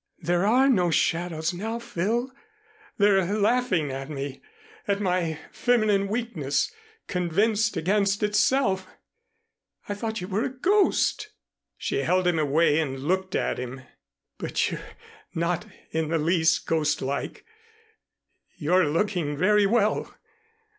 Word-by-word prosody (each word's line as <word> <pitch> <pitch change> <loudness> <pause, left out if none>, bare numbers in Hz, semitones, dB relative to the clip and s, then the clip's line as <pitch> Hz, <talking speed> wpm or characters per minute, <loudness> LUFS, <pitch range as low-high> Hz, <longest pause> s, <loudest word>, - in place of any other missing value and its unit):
There 175 +3 0
are 255 +5 +4
no 185 -10 +3
shadows 165 +1 0
now, 220 +6 -3
Phil. 235 +3 -2 0.7
They're 200 -2 +4
laughing 205 - +1
at 135 +1 -6
me, 140 -2 -5 0.5
at 200 -1 +1
my 180 -5 0
feminine 215 -5 +2
weakness, 200 - -1 0.3
convinced 205 +4 +1
against 195 +4 +1
itself. 210 -2 +2 1.0
I 205 - -2
thought 220 +2 -4
you 180 - -5
were 205 +3 -1
a - - -1
ghost." 395 +8 +1 0.5
She - - -2
held 185 - +1
him 175 -2 +2
away 155 +1 +3
and 135 -4 -2
looked 185 +5 -1
at - - -1
him. 130 +1 -6 0.6
"But - - -1
you're - - -5 0.5
not 170 +5 -1 0.2
in 160 0 -1
the 165 +1 0
least 165 +1 +2
ghostlike. 150 -3 -1 1.1
You're 175 +2 +2
looking 165 -2 -1
very 205 +4 +4
well. 215 0 +1
185 Hz, 120 wpm, -26 LUFS, 160-210 Hz, 1.1 s, are